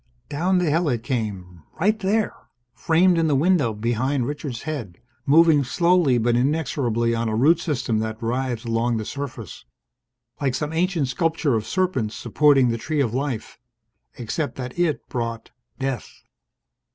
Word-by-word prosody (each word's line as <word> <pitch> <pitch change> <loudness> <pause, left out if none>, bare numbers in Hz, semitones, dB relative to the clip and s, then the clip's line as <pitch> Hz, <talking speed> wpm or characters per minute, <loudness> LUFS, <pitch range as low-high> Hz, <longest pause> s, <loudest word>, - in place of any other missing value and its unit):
Down 180 +6 +1
the 175 -4 +1
hill 165 +1 +1
it 120 -3 -1
came 100 - -4 0.2
right 210 +5 +2
there! 210 +2 0 0.4
framed 170 +1 +3
in 165 - +2
the 145 - +2
window 150 -4 +3
behind 120 +5 -1
Richard's 145 -3 -5
head, 120 - -5 0.3
moving 155 0 +5
slowly 170 -1 +3
but 120 +1 +2
inexorably 125 -4 0
on 115 0 -1
a 110 - -1
root 155 +9 +4
system 130 -9 -1
that 110 0 -3
writhed 120 0 -2
along 115 +1 0
the 110 - -4
surface. 140 +1 -7 0.8
Like 135 -3 0
some 150 +3 -3
ancient 165 -5 0
sculpture 160 +1 0
of 110 -1 -1
Serpents 180 - -1
Supporting 135 +1 +3
the 115 0 -2
Tree 155 +5 -2
of 120 -5 +1
Life. 130 -5 -3 0.6
Except 125 +3 -3
that 125 +4 -6
it 170 -4 0
brought 115 -2 -4 0.3
death 135 -2 -3
135 Hz, 150 wpm, -23 LUFS, 115-160 Hz, 0.8 s, moving